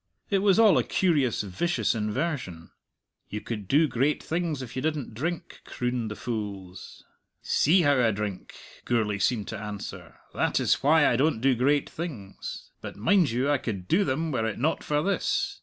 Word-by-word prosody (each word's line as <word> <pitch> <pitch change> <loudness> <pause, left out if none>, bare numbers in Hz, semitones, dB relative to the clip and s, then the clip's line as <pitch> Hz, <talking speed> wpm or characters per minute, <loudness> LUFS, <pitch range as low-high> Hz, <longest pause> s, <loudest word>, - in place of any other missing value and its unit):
It 195 - +3
was 195 0 +4
all 220 -3 +6
a - - +1
curious, 145 - +1
vicious 105 - 0
inversion. 105 - -3 0.6
"You 105 - -4
could 105 -3 -6
do 155 - +4
great 135 +3 0
things 160 -5 -2
if 120 -1 -9
you 130 - -2
didn't 150 -6 -2
drink," 170 +8 -4
crooned 125 -2 -3
the 105 - -5
fools. 100 -6 -6 0.4
"See 175 +5 +3
how 145 -3 +4
I 115 - +4
drink," 105 -3 -4 0.3
Gourlay 105 -4 0
seemed 105 +1 0
to 110 - -5
answer; 105 -1 -7 0.2
"that - - +1
is - - +2
why 150 +2 +5
I 120 - +2
don't 145 -2 +2
do 135 +3 +3
great 140 +4 +2
things. 130 - -7
But, - - -7
mind 165 - +3
you, 125 +5 0
I 145 - +2
could 100 -7 -5
do 195 +5 +3
them 155 +3 -1
were 110 -5 0
it 110 - -3
not 155 +7 0
for 150 0 0
this." 200 +1 -1
130 Hz, 180 wpm, -27 LUFS, 105-155 Hz, 0.6 s, all